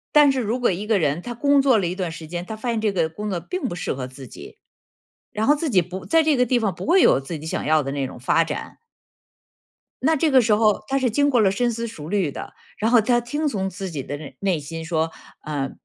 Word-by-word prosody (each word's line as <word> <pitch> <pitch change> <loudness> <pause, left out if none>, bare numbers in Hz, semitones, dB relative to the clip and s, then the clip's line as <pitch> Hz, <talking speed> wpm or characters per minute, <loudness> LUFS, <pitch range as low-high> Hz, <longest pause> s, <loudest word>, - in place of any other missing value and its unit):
但 295 -2 +7
是 265 - -1
如 240 +2 -2
果 245 - +3
一 195 +4 -4
个 220 -2 +3
人， 155 -2 0
他 240 +5 -6
工 280 +4 +3
作 265 -4 +4
了 195 - 0
一 175 - -2
段 185 -2 -3
时 165 0 -8
间， 175 +2 -5
他 220 - -6
发 225 +3 -4
现 230 -1 0
这 215 -2 0
个 165 -4 +1
工 210 +6 -5
作 180 -4 -2
并 370 -2 -5
不 175 - -4
适 175 - -3
合 130 -1 -5
自 130 -1 -12
己， - - -12 0.8
然 215 +1 -1
后 295 - +5
自 315 +1 -2
己 195 -7 +4
不 180 +2 -7
在 325 0 +3
这 305 -3 +2
个 250 - +3
地 250 +1 +2
方 215 -5 0
不 - - -7
会 360 +4 +5
有 - - +5
自 145 +5 -6
己 155 - -10
想 160 - -3
要 155 0 +3
的 135 - -4
那 140 -1 -2
种 - - -10
发 145 +7 +2
展。 - - -6 1.2
那 315 +5 +3
这 315 +2 +2
个 260 -1 +6
时 225 -2 +2
候 215 -1 +2
他 270 - 0
是 260 -2 +1
经 285 +6 +2
过 250 -4 +3
了 195 -3 +4
深 240 +4 0
思 230 +1 -4
熟 160 -9 -9
虑 190 -6 0
的， - - -8 0.2
然 220 +2 0
后 240 -2 +6
他 240 +2 +2
听 295 +6 -2
从 195 -8 -2
自 190 0 -6
己 150 -5 -5
的 145 - -5
内 145 -2 -10
内 190 -5 +1
心 160 +3 -7
说， 160 -1 -1 0.3
呃， 140 -3 -3
205 Hz, 295 characters per minute, -22 LUFS, 165-245 Hz, 1.2 s, 但